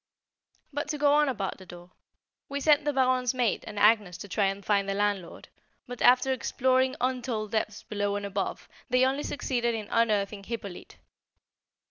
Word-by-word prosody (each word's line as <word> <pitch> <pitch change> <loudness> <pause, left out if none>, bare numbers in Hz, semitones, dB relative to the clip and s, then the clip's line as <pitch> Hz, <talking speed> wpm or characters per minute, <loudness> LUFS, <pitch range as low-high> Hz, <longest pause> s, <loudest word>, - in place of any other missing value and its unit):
But 290 +1 -3
to 300 0 -3
go 290 0 +3
on 295 -1 +4
about 200 -8 -3
the 190 - -12
door. 175 0 -12 0.6
We 280 0 -3
sent 295 +1 +3
the 295 - +2
Baronne's 255 -2 +1
maid 245 -4 0
and 210 - -8
Agnès 205 -4 +3
to - - -7
try 200 +1 +1
and 195 +1 -2
find 200 -1 +1
the 195 - -1
landlord; 205 -4 -2 0.4
but, 245 -1 -8
after 255 +2 +5
exploring 260 +1 +1
untold 245 -4 -2
depths 215 -1 -2
below 205 -1 -2
and 205 0 -3
above, 200 -1 -3 0.2
they 255 +1 +4
only 270 +2 0
succeeded 240 -5 -1
in 215 -2 -5
unearthing 210 -3 +1
Hippolyte. 200 -5 -7
230 Hz, 170 wpm, -28 LUFS, 205-260 Hz, 0.6 s, after